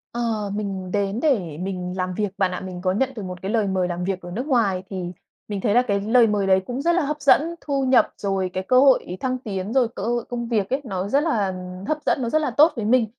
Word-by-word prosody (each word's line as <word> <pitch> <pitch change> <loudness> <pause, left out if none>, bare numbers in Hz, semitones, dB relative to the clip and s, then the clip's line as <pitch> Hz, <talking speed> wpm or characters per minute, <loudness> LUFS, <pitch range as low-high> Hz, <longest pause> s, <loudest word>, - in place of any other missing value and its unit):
Ờ, 220 -4 -1
mình 195 -3 -4
đến 200 +2 -1
để 195 - 0
mình 180 0 -4
làm 185 0 -2
việc 205 0 -2
bạn 190 -2 +1
ạ. 180 - -4
Mình 180 -1 -7
có 185 - +1
nhận 255 +8 +1
được 210 - -6
một 180 -1 -7
cái 195 +2 -3
lời 220 -3 +1
mời 185 -2 0
làm 175 0 -3
việc 185 0 -2
ở 175 0 -9
nước 245 +9 -4
ngoài 205 -9 +1
thì 180 -3 -4 0.4
mình 205 -2 -4
thấy 205 -1 +1
là 245 - +6
cái 200 -5 -1
lời 230 +2 +4
mời 205 -2 0
đấy 190 0 +4
cũng 250 +2 -4
rất 340 - +2
là 360 - +3
hấp 300 +1 -3
dẫn, 280 0 +6 0.2
thu 275 -2 -1
nhập, 255 -1 +4
rồi 195 -2 -1
cái 185 - -2
cơ 255 +6 +4
hội 260 -9 +3
thăng 255 -1 -1
tiến, 205 -2 -5
rồi 255 -3 +4
cơ - - -5
hội 240 0 -1
công 240 -1 -3
việc 215 -5 0
ấy, 270 +2 0
nó 195 -5 -3
rất 280 +7 +2
là 210 - 0 0.3
hấp 310 - 0
dẫn, - - +1
nó 235 - -1
rất 310 - +2
là 300 - -1
tốt 310 +3 +5
với 225 -4 -3
mình. 240 +1 +4
210 Hz, 275 wpm, -23 LUFS, 190-250 Hz, 0.4 s, là